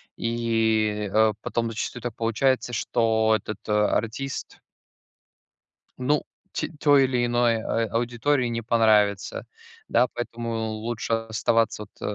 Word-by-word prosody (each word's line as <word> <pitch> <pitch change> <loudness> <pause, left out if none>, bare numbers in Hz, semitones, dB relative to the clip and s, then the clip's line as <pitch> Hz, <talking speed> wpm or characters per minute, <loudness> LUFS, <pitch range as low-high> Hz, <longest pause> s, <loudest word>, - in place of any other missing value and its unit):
и, 110 -3 0
э, 110 0 +4
потом 115 -1 -2
зачастую 120 +2 -4
так 120 -3 -4
получается, 120 +3 +1
что 110 -2 +2
этот 105 - -8
артист 110 +5 -1 1.4
Ну 145 +4 +1 0.3
те - - -2
той 145 -2 +5
или 125 -2 +1
иной, 120 -2 +2
а 115 +1 0
аудитории 120 +3 +1
не 115 0 -2
понравится, 110 -3 +2 0.4
да, 125 - +3
поэтому 120 -1 -4 0.2
лучше 115 +1 -3
оставаться, 115 0 0
вот, - - -19
115 Hz, 115 wpm, -25 LUFS, 110-120 Hz, 1.4 s, той